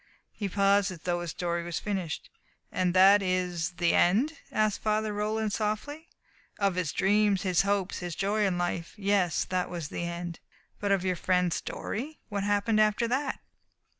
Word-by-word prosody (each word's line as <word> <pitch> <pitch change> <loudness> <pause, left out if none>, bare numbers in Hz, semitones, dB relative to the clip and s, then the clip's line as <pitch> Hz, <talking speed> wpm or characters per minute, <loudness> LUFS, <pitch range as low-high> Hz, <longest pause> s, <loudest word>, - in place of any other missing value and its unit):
He 200 -2 -4
paused, 200 +1 +3
as 180 -4 -8
though 175 0 -1
his 175 - -4
story 170 0 -2
was 170 0 -3
finished. 190 -7 -4 0.4
"And 180 -1 0
that 195 +2 +7
is 180 -2 -1
the 175 -1 +1
end?" 240 - +3 0.2
asked 215 -1 +1
Father 215 0 0
Roland 215 0 -1
softly. 230 +10 -3 0.5
"Of 200 -2 +2
his 175 -4 -1
dreams, 200 +1 +2
his 185 -3 +3
hopes, 200 -1 -1
his 175 -3 -5
joy 210 +2 0
in 180 -2 -1
life 175 -1 -3
yes, 195 -4 +1
that 185 -1 -1
was 170 -4 -5
the 170 - -4
end." 170 0 -5 0.4
"But 205 -1 -1
of 190 -2 +2
your 185 -1 +1
friend's 180 0 +1
story? 290 +8 -5
What 200 -2 -2
happened 205 +2 +2
after 215 +2 +2
that?" 270 +3 -1
195 Hz, 170 wpm, -28 LUFS, 175-210 Hz, 0.5 s, that